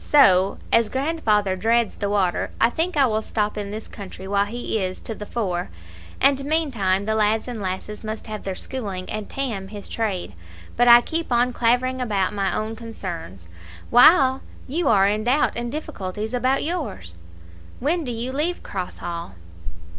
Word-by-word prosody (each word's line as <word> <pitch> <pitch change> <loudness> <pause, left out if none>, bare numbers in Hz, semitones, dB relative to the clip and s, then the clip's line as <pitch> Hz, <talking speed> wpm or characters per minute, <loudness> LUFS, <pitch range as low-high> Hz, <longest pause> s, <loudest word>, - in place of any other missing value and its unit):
So, 195 -10 +5 0.2
as 230 -2 +4
grandfather 230 - +1
dreads 230 +3 +1
the 200 - -2
water, 195 -4 +1
I 230 - +4
think 330 +3 -1
I 275 - +6
will 220 -3 0
stop 210 -1 -1
in 205 -1 -4
this 215 +2 -6
country 190 -1 -9
while 200 0 +2
he 225 -1 -2
is 185 0 -3
to 225 - -5
the 210 -1 -8
fore, 180 - -2 0.5
and 275 0 +3
meantime 240 -11 0
the 220 - 0
lads 220 +1 +1
and 240 -4 -5
lasses 190 +3 -4
must 215 0 -5
have 215 -1 -6
their 190 -1 -3
schooling 195 -6 -5
and 215 -1 -5
Tam 230 -8 -3
his 205 0 -8
trade. 200 - -2 0.4
But 245 +1 +3
I 240 0 +10
keep 325 +3 -3
on 245 +1 +3
clavering 250 +2 +1
about 205 -5 0
my 195 -2 0
own 215 +1 -2
concerns, 175 - -7 0.4
while 265 +1 +6 0.2
you 310 +4 -1
are 200 -4 +5
in 210 +1 0
doubt 265 +5 +3
and 235 0 -2
difficulties 215 -7 -5
about 255 +2 +1
yours. 275 - -4 0.7
When 320 +6 0
do 250 - -4
you 235 +2 -3
leave 310 +6 -1
Cross 185 -2 -5
Hall?" 170 - -5
220 Hz, 175 wpm, -23 LUFS, 195-255 Hz, 0.7 s, I